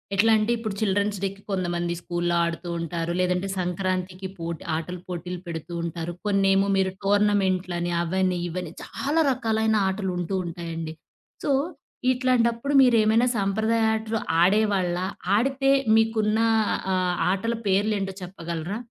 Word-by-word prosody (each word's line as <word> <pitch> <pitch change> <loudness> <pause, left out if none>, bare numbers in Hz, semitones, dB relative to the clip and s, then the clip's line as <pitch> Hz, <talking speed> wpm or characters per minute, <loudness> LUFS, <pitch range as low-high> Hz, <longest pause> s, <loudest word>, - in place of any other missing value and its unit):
ఎట్లా 225 +4 +4
అంటే, 215 +2 +1
ఇప్పుడు 220 -3 -4
చిల్డ్రెన్స్ 205 0 +1
డేకి 195 0 -3
కొంతమంది 175 -2 -1
స్కూల్లో 175 0 -1
ఆడుతూ 170 +1 -4
ఉంటారు. 170 0 -3
లేదంటే 180 +1 +1
సంక్రాంతికి 185 +1 -2
పోటి 165 -1 -5
ఆటల 170 +3 -4
పోటీలు 180 0 -5
పెడుతూ 165 0 -6
ఉంటారు. 170 0 -4
కొన్నేమో 195 -1 +3
మీరు 190 0 +2
టోర్నమెంట్లని 190 -4 +1
అవనీ, 185 +1 0
ఇవనీ 175 -1 -5
చాలా 310 +4 0
రకాలైన 220 -2 +1
ఆటలు 190 0 -2
ఉంటూ 180 +2 -2
ఉంటాయండి. 165 -1 -5 0.5
సో, 290 - +2 0.6
ఇట్లాంటప్పుడు 250 0 +1
మీరేమైనా 230 -1 +4
సాంప్రదాయ 220 +3 +1
ఆటలు 220 0 -2 0.2
ఆడేవాళ్ళా? 185 -2 +2 0.3
ఆడితే 270 +3 +1 0.3
మీకున్న 220 -1 +2 0.6
ఆహ్, 180 -1 +1 0.2
ఆటల 200 +5 -1
పేర్లేంటో 195 0 +1
చెప్పగలరా? 170 +1 -5
190 Hz, 120 wpm, -25 LUFS, 175-220 Hz, 0.6 s, ఎట్లా